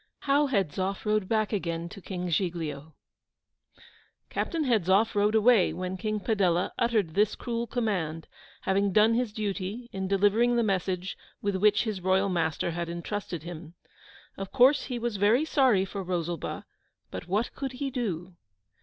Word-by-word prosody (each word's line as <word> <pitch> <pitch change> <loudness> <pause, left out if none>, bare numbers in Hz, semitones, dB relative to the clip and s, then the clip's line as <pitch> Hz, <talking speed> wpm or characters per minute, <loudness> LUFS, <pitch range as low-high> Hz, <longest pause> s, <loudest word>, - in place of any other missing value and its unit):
HOW 285 +1 +3
HEDZOFF 195 - -1
RODE 210 -2 +1
BACK 215 -1 +1
AGAIN 170 -4 -2
TO 195 +3 -11
KING 180 -1 -5
GIGLIO 160 -4 -2 1.4
Captain 330 -3 -1
Hedzoff 215 - +3
rode 210 +1 +2
away 220 -3 +5
when 185 0 -4
King 215 +2 -2
Padella 190 -5 +1
uttered 220 -9 +1
this 205 +3 +2
cruel 235 -1 -3
command, 180 -10 -2 0.3
having 195 +1 +1
done 215 +3 +5
his 240 -1 0
duty 210 +2 -4
in 190 0 -3
delivering 205 +5 +3
the 235 - +3
message 190 -2 -1 0.2
with 200 -1 -1
which 210 +2 +3
his 215 -5 -3
royal 190 +2 +2
master 170 -1 0
had 170 0 -3
entrusted 170 -1 -4
him. 170 -1 -9 0.6
Of 195 -1 -5
course 270 +3 +5
he 250 - -3
was 235 -3 -2
very 220 +9 +3
sorry 255 -11 +3
for 195 +1 -5
Rosalba, 175 -3 -3 0.5
but - - -6
what 205 +6 0
could 270 -2 -4
he 270 +2 -3
do? 185 -8 -3
200 Hz, 155 wpm, -28 LUFS, 180-225 Hz, 1.4 s, away